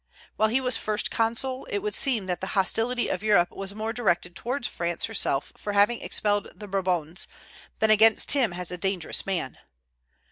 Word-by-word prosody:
While 220 - +2
he 245 +4 +2
was 250 -3 +3
First 215 -1 -1
Consul, 245 +4 0
it 425 - -1
would 425 - -2
seem 240 -8 +1
that 180 -1 -3
the 190 - -4
hostility 230 +6 +2
of 185 - -2
Europe 205 -5 +3
was 195 +1 -6
more 220 +1 -3
directed 180 -7 0
towards 250 +2 -2
France 170 -1 -2
herself 195 -10 -1
for 205 - -5
having 205 +4 +3
expelled 205 -1 +1
the 210 - -9
Bourbons, 180 -4 -1 0.5
than 220 0 +3
against 220 +1 +5
him 260 -8 +2
as 180 0 -4
a 180 - -5
dangerous 190 -2 -1
man. 175 -9 -3
210 Hz, 180 wpm, -26 LUFS, 185-230 Hz, 0.5 s, against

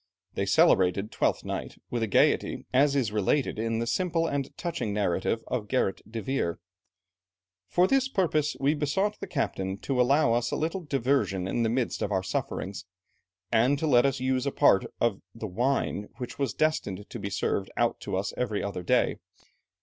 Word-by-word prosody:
They - - -2
celebrated 95 +3 +3
Twelfth - - 0
Night - - -5
with 115 -3 -1
gaiety, - - +2
as 140 +2 +4
is 125 -6 +1
related 110 +4 0
in 115 0 -1
the 115 - -1
simple 165 +4 0
and 140 -4 -2
touching 165 - -3
narrative 100 +2 0
of 105 -4 -3
Gerrit 115 -5 0
de 115 -2 -4
Veer. 130 -10 -1 1.1
"For 180 - +3
this 270 +5 +2
purpose, 160 - +1
we 140 +2 +3
besought 175 +8 0
the - - -6
captain 95 - -2
to 130 -2 +1
allow 140 0 +4
us 120 +1 +1
a - - -2
little 165 +4 -2
diversion 130 - 0
in 120 - -1
the 115 - +2
midst 120 +1 -1
of 105 - -1
our 95 -1 +1
sufferings, 95 +1 -3 0.7
and 125 +6 +3
to 160 - -2
let 125 -3 +5
us 135 -1 -1
use 130 +1 0
a - - +1
part 95 - +4
of 115 -4 +1
the 115 - -6
wine 110 0 -1
which 125 +1 -7
was 135 -6 -1
destined 105 -11 -1
to - - -7
be 100 - -4
served 95 0 -1
out - - +1
to - - -3
us 100 +2 -2
every 110 -5 -1
other 100 -3 -3
day. 90 - +2
120 Hz, 180 wpm, -28 LUFS, 105-140 Hz, 1.1 s, let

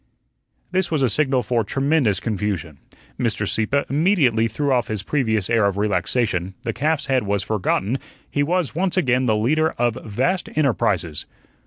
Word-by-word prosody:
This 185 0 0
was 155 -4 +1
a 125 - +2
signal 135 -3 +1
for 115 +1 0
tremendous 135 - +1
confusion. 100 -9 -3 0.4
Mr. 110 -4 0
Sieppe 125 +8 +1
immediately 140 - +2
threw 140 +5 -1
off 125 -2 +1
his 105 -3 -3
previous 110 -7 0
air 115 -3 +3
of 100 -1 -2
relaxation, 95 -1 0
the 115 -3 -2
calf's 150 +5 0
head 135 -2 +2
was 100 -2 -1
forgotten, 110 +3 0 0.3
he 145 - -1
was 170 +1 0
once 185 +3 -1
again 130 -6 +2
the 110 -2 +3
leader 155 +9 +1
of 120 -1 0
vast 130 - -1
enterprises. 100 - 0
120 Hz, 160 wpm, -22 LUFS, 105-145 Hz, 0.4 s, air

